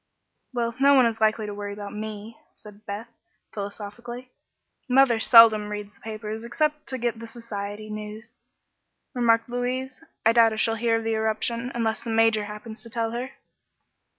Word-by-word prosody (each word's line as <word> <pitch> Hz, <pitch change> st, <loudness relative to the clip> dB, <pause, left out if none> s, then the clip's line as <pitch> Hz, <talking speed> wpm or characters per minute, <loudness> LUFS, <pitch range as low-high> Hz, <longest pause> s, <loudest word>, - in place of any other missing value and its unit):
"Well, 235 Hz, -2 st, -1 dB
no 280 Hz, +1 st, +6 dB
one 260 Hz, -2 st, +6 dB
is 225 Hz, -1 st, -1 dB
likely 215 Hz, 0 st, +2 dB
to 205 Hz, -, -5 dB
worry 205 Hz, 0 st, -5 dB
about 205 Hz, 0 st, -7 dB
me," 215 Hz, +1 st, -6 dB, 0.2 s
said 210 Hz, 0 st, -15 dB
Beth, 205 Hz, +3 st, -5 dB, 0.5 s
philosophically. 220 Hz, +5 st, -7 dB, 0.6 s
"Mother 250 Hz, -3 st, +5 dB
seldom 220 Hz, -3 st, +7 dB
reads 210 Hz, 0 st, -6 dB
the -, -, -26 dB
papers, 220 Hz, 0 st, -6 dB
except 300 Hz, +5 st, -1 dB
to 260 Hz, -, -3 dB
get 235 Hz, -2 st, -2 dB
the 230 Hz, -, -8 dB
society 215 Hz, -2 st, -6 dB
news," 215 Hz, +2 st, -8 dB, 0.8 s
remarked 230 Hz, -3 st, +3 dB
Louise. 255 Hz, +3 st, -3 dB, 0.2 s
"I 225 Hz, -, +7 dB
doubt 230 Hz, -1 st, +5 dB
if 220 Hz, -, -4 dB
she'll 225 Hz, -, +2 dB
hear 230 Hz, 0 st, +1 dB
of 225 Hz, -, -4 dB
the 225 Hz, 0 st, 0 dB
eruption, 220 Hz, +2 st, -1 dB
unless 225 Hz, -2 st, -1 dB
the 235 Hz, -, -5 dB
Major 225 Hz, -1 st, +3 dB
happens 210 Hz, +2 st, -9 dB
to 230 Hz, -, -12 dB
tell 225 Hz, 0 st, -2 dB
her." 245 Hz, +3 st, -5 dB
225 Hz, 170 wpm, -25 LUFS, 215-240 Hz, 0.8 s, seldom